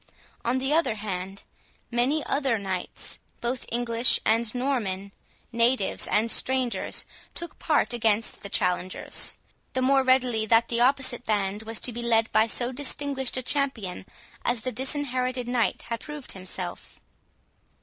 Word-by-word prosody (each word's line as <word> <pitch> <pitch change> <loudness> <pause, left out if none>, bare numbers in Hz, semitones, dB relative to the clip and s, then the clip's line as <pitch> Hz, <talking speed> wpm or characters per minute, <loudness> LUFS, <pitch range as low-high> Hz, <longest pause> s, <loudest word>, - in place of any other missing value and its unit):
On 240 +2 +1
the 270 +3 0
other 320 -8 +2
hand, 195 -2 -5 0.5
many 260 +6 +2
other 270 -5 +1
knights, 190 -3 -4 0.2
both 240 +1 -2
English 235 0 +2
and 225 +1 +2
Norman, 215 -7 -1 0.4
natives 235 -3 +3
and 220 +2 +2
strangers, 260 -2 0 0.3
took 340 - -5
part 300 -5 +2
against 225 -2 +1
the 200 - -6
challengers, 180 -1 +1 0.4
the 260 - 0
more 270 +1 +5
readily 255 -4 +3
that 230 +1 +4
the 235 0 +1
opposite 260 -1 +3
band 205 -2 0
was 225 0 -3
to 245 - 0
be 240 - -4
led 225 -1 +2
by 220 +1 +4
so 240 +2 -1
distinguished 270 -1 0
a 255 - -2
champion 240 -10 -2 0.4
as 240 -1 0
the 255 - -2
Disinherited 255 -1 -1
Knight 245 -2 0
had 230 -1 -4
approved 295 -3 -5
himself. 185 -1 -6
240 Hz, 140 wpm, -26 LUFS, 220-260 Hz, 0.5 s, more